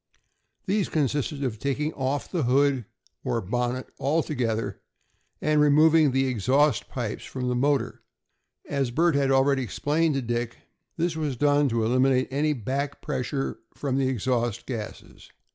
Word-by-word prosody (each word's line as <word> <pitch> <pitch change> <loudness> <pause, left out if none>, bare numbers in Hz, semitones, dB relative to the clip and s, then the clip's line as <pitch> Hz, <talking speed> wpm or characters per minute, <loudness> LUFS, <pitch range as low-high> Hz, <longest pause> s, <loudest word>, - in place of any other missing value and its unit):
These 200 0 0
consisted 145 -1 -1
in 130 - 0
taking 140 +5 -2
off 135 +1 -2
the 175 - -2
hood, 135 -1 +2 0.4
or 115 - 0
bonnet, 125 +5 -2
altogether, 130 -7 -1 0.6
and 150 -1 +2
removing 155 +1 +5
the 135 +1 +2
exhaust 130 +3 +2
pipes 120 -5 -4
from 125 -1 -4
the 125 - 0
motor. 135 -1 0 0.7
As 140 -3 -1
Bert 165 +7 +2
had 140 -1 +2
already 135 0 +3
explained 150 - 0
to 135 - -1
Dick, 120 0 -2 0.4
this 170 0 0
was 150 -5 -2
done 145 +1 +3
to 115 -1 0
eliminate 130 +2 +2
any 150 +3 +1
back 135 +3 -3
pressure 135 0 -3 0.2
from 135 -2 -1
the 135 - +2
exhaust 120 -2 -1
gases. 115 -5 -7
135 Hz, 145 wpm, -26 LUFS, 125-145 Hz, 0.7 s, removing